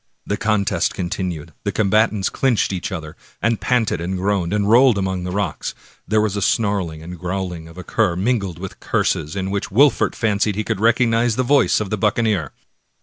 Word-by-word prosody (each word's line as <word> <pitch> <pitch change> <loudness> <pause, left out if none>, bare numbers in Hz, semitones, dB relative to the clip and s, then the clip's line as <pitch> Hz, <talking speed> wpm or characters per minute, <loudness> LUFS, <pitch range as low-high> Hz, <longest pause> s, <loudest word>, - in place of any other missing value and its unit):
The 100 - -1
contest 105 -2 0
continued, 85 -4 -4
the 100 - -1
combatants 105 0 +2
clinched 125 -7 +1
each 90 - -4
other, 80 -4 -6 0.2
and 115 0 0
panted 115 -9 +1
and 95 +2 -2
groaned, 95 -2 0
and 105 -1 +1
rolled 120 +1 +5
among 95 -2 -2
the 90 - -3
rocks. 100 -4 -3 0.3
There 110 +2 +2
was 105 -2 0
snarling 95 -8 0
and 90 +1 -8
growling 90 -2 -4
as - - -12
of 80 - -16
a 90 - -7
cur, 85 - +1
mingled 100 -3 -1
with 95 +1 -8
curses, 75 +1 -1
in 95 0 -2
which 100 0 -2
Wol 140 +8 +6
fert - - -1
fancied 105 -2 +1
he 110 - -1
could 95 - -2
recognize 115 0 +3
the 130 - +1
voice 140 +3 +3
of 105 -3 -4
the 110 - 0
buccaneer. 105 - +1
100 Hz, 195 wpm, -20 LUFS, 90-110 Hz, 0.3 s, Wol